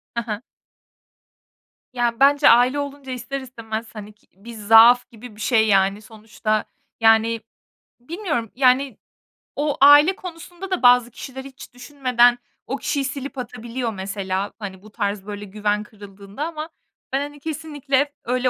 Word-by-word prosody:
Hı 235 - 0
hı. 215 -1 -5 1.5
Ya, 240 -1 -1
bence 285 +2 +5
aile 245 +4 +4
olunca 280 -1 -6
ister 255 +2 -5
istemez, 230 -3 -7
hani, 210 0 -9
ki 205 - -34
bir 215 +5 -12
zaaf 225 +3 +6
gibi 235 -2 -13
bir 215 - -12
şey, 220 -3 +2
yani, 195 0 +2
sonuçta 215 0 -3 0.3
yani 225 0 +3 0.6
bilmiyorum, 300 - -4
yani 255 -1 +2 0.6
o 290 0 -1
aile 290 +6 +7
konusunda 355 +1 -9
da 370 - -1
bazı 245 -1 +5
kişiler 265 +3 -9
hiç 270 -2 -13
düşünmeden 245 -2 +2 0.3
o 270 - -3
kişiyi 285 -1 -2
silip 275 0 -6
atabiliyor 240 -1 -5
mesela. 195 0 -4
Hani, 190 -3 -8
bu 215 - -16
tarz 200 -1 -3
böyle 205 0 -7
güven 210 +1 -2
kırıldığında 205 +3 -10
ama 315 -1 -6 0.4
ben, 270 - +2
hani, 290 0 -7
kesinlikle 290 -2 -2
öyle 255 +1 0
245 Hz, 145 wpm, -22 LUFS, 215-275 Hz, 1.5 s, aile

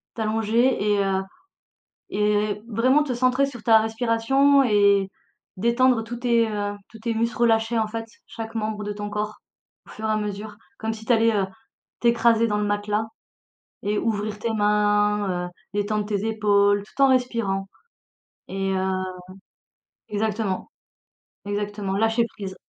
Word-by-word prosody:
t'allonger 225 +3 +1 0.2
et 200 - +2
heu, 190 0 0 0.9
et 210 0 0
vraiment 255 +6 +3
te 265 - -2
centrer 255 +3 +2
sur 245 -5 -10
ta 225 -1 +6
respiration 245 +5 +3
et 200 -4 +3 0.5
détendre 235 +2 +3
tous 235 +1 -6
tes, 235 -2 +2
heu, 205 -1 -3
tous 225 - -13
tes 230 +1 -2
muscles 230 +1 -1
relâchés, 225 0 +2
en 220 - 0
fait, 225 +1 -5 0.2
chaque 225 -1 -7
membre 215 -1 -2
de 210 - -3
ton 205 0 -5
corps 210 0 -3 0.5
au - - -16
fur 220 - -7
et 215 - +1
à 215 - +1
mesure, 210 0 -5 0.2
comme 220 0 -2
si 220 0 -11
t'allais, 230 -2 +3
heu, 195 - +2 0.5
t'écraser 235 -1 +3
dans 210 - 0
le 210 - 0
matelas 205 +1 -1 0.8
et 205 +1 0
ouvrir 210 -1 -1
tes 230 +1 -1
mains, 210 -3 +1
heu, - - -9 0.2
détendre 205 0 -1
tes 210 0 -2
épaules, 205 -2 +3
tout 215 - -6
en - - +7
respirant 230 -7 0 0.8
et 195 0 -2
heu 190 0 -1 1.1
exactement, 210 +1 -2 0.8
exactement, 205 -1 -3
lâcher 225 +2 +2
prise. 190 -2 -6
215 Hz, 150 wpm, -24 LUFS, 205-230 Hz, 1.1 s, en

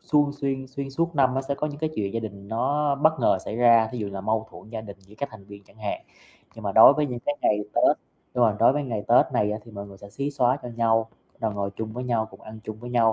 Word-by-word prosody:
suôn 145 -1 +2
xuyên 135 -2 -3
xuyên 135 +1 -5
suốt 165 +4 -1
năm 130 -2 +3
á 135 - +1
sẽ 140 - +1
có 150 - -2
những 145 -1 -6
cái 155 0 -1
chuyện 100 0 -2
gia 115 - 0
đình 100 -2 -8
nó 140 +5 +1
bất 155 +3 +4
ngờ 95 - +3
xảy 110 - -4
ra, 115 -2 +5
thí 125 - -4
dụ 105 -2 -3
là 95 - -5
mâu 110 +2 -1
thuẫn - - -13
gia 115 -1 -4
đình 100 -2 -10
giữa 95 +2 -18
các 140 - -2
thành 100 -3 -12
viên 100 0 -12
chẳng 100 - -23
hạn, 105 -2 -4 0.5
nhưng 115 - -11
mà 100 - -1
đối 110 +6 +9
với 150 -1 +1
những 125 -2 -4
cái 145 - +1
ngày 105 - +3 0.2
Tết - - +4 0.4
nhưng 120 -1 +4
mà 105 -2 +2
đối 115 - +6
với 145 +1 -1
ngày 115 -5 -3
Tết 120 - +6
này 105 -4 +2
á 105 - -3
thì 115 - -13
mọi 100 -1 -7
người 100 -1 -13
sẽ 100 0 -12
xí 140 +5 -3
xóa 130 -2 +2
cho 125 - -6
nhau, 115 -1 +2 0.3
rồi 110 -2 -1
ngồi 100 -1 -2
chung 110 -1 -4
với 125 +2 -5
nhau, 115 -3 0
cùng - - -15
ăn 110 0 -10
chung 110 -1 -6
với 120 0 -7
nhau, 115 -2 +4
115 Hz, 295 wpm, -25 LUFS, 105-135 Hz, 0.5 s, đối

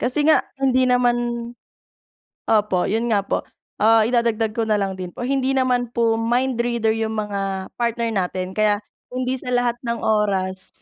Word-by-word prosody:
kasi 260 +4 0
nga 315 - +6 0.2
hindi 260 -1 +3
naman 245 -1 +3 1.3
opo, 210 -4 +2
'yun 230 +3 0
nga 200 -2 +2
po. - - -1 0.4
Ah, 225 +1 +5
idadagdag 230 -2 +1
ko 225 0 -2
na 215 - +3
lang 195 -2 -1
din 180 -1 -5
po, 245 - -5
hindi 270 +1 0
naman 250 -2 +1
po 230 -1 +2
mind 240 +2 0
reader 235 -2 +1
yung 220 0 -2
mga 195 -2 -3
partner 235 -1 0
natin, 185 -2 -2
kaya 210 0 +1 0.2
hindi 255 +1 -2
sa 250 - -5
lahat 240 -1 0
ng 235 0 -1
oras 195 -3 0
225 Hz, 165 wpm, -21 LUFS, 210-245 Hz, 1.3 s, nga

